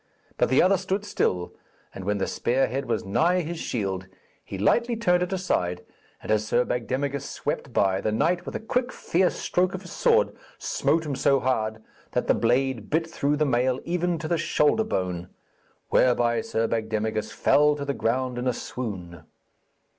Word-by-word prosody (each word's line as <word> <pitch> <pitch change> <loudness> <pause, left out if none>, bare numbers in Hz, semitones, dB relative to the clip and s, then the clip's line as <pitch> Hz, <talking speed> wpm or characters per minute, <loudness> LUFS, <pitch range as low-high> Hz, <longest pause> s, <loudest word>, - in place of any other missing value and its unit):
But - - +2
the 130 - +5
other 190 +2 +4
stood 195 +2 -2
still, 90 - -1 0.4
and 95 - -8
when 105 +1 0
the 95 - 0
spear 130 +3 +1
head 135 +1 -3
was 115 -4 -1
nigh 170 - +2
his 170 0 -5
shield, 95 - -3 0.4
he 95 - -7
lightly 235 - +2
turned 180 -6 +2
it 180 - -1
aside, 90 - -1 0.4
and - - -3
as 110 0 +3
Sir 125 +2 +2
Bagdemagus 135 +3 -2
swept 145 -2 -3
by, 95 -3 +2
the 110 - 0
knight, 175 +11 +1
with - - -7
a - - -1
quick 250 +3 -1
fierce 180 +2 +1
stroke 185 +1 0
of 190 - -7
his - - -10
sword, 475 0 +2 0.2
smote 160 0 0
him 145 -2 -2
so 135 +1 +3
hard 110 -4 -1 0.3
that - - 0
the - - +4
blade 120 -1 +1
bit 160 +2 +1
through 150 -3 0
the 155 - +2
mail 130 -1 +1
even 175 0 0
to 155 0 -5
the 170 0 0
shoulder 150 +9 +2
bone; 90 - -3 0.6
whereby 120 -2 +3
Sir 115 0 -1
Bagdemagus 110 -1 -2
fell 150 0 +4
to 140 -1 -5
the 140 - -1
ground 125 +1 -1
in 125 - -2
a 125 - +2
swoon. 95 -10 -6
130 Hz, 185 wpm, -25 LUFS, 110-170 Hz, 0.6 s, the